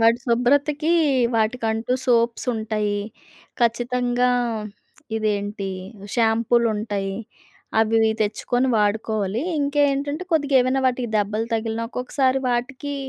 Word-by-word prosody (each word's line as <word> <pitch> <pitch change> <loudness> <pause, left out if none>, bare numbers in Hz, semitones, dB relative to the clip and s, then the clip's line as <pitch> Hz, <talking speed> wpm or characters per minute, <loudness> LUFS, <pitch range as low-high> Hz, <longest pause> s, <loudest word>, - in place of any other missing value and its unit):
వాటి 230 +1 +4
శుభ్రతకి 285 +6 +2 0.4
వాటికంటూ 225 +1 0
సోప్స్ 235 -1 +2
ఉంటాయి. 215 -2 -1 0.6
ఖచ్చితంగా. 245 +1 +1 0.9
ఇదేంటి 205 -2 -2 0.5
షాంపూలుంటాయి. 225 -3 +1 0.6
అవి 220 0 +2
ఇవి 220 0 +4
తెచ్చుకొని 245 +4 0
వాడుకోవాలి. 215 +1 0 0.2
ఇంకేంటంటే 285 +1 +1
కొద్దిగా 290 -3 +1
ఏవైనా 255 +2 +1
వాటికి 250 -1 0
దెబ్బలు 210 +2 0
తగిలిన, 225 0 -1
ఒక్కొక్కసారి 260 +2 0
వాటికి 260 +4 -2
235 Hz, 90 wpm, -22 LUFS, 220-255 Hz, 0.9 s, వాటి